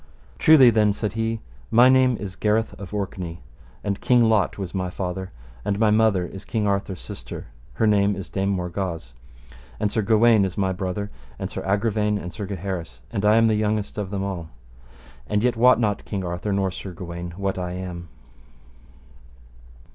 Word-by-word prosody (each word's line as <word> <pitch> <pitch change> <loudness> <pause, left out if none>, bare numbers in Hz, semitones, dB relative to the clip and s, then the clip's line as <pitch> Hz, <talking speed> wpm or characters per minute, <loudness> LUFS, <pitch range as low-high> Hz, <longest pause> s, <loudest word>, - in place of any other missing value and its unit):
Truly 140 -6 +8
then, 105 -2 +3
said 105 -1 -3
he, 115 0 -2 0.3
my 120 +2 +7
name 130 -2 +4
is 95 -2 -6
Gareth 110 +1 +1
of 100 -3 -8
Orkney, 95 -6 -4 0.4
and 100 -1 -2
King 125 -1 +4
Lot 110 -4 +2
was 95 -3 -5
my 95 -2 -2
father, 95 +1 -4 0.3
and 100 - -1
my 110 -1 +4
mother 105 -4 +3
is 95 +3 -9
King 110 -3 -1
Arthur's 100 -2 -1
sister, - - -8 0.3
her 110 - +1
name 100 -1 +3
is 95 -1 -6
Dame 95 0 -1
Morgawse, 90 -6 -3 0.7
and 105 -1 0
Sir 110 - +1
Gawaine 110 0 +5
is 95 -2 -3
my 95 -2 +1
brother, 95 +2 -3 0.3
and - - -5
Sir - - -4
Agravaine 105 +1 +1
and 90 -3 -6
Sir 105 -4 -5
Gaheris, 90 -10 -5
and 100 - -2
I 105 +1 +5
am 115 0 +5
the 110 - +3
youngest 105 0 -1
of 100 -3 -3
them 100 -1 -2
all. 90 -5 -4 0.8
And 105 +1 0
yet 125 -1 +2
wot 125 +2 +5
not 105 -3 0
King 95 -3 -4
Arthur 90 +4 -3
nor 95 -1 +1
Sir 95 0 -7
Gawaine 85 0 -7
what 100 -1 -2
I 90 0 -3
am. 90 -2 -6
100 Hz, 180 wpm, -24 LUFS, 95-110 Hz, 0.8 s, Truly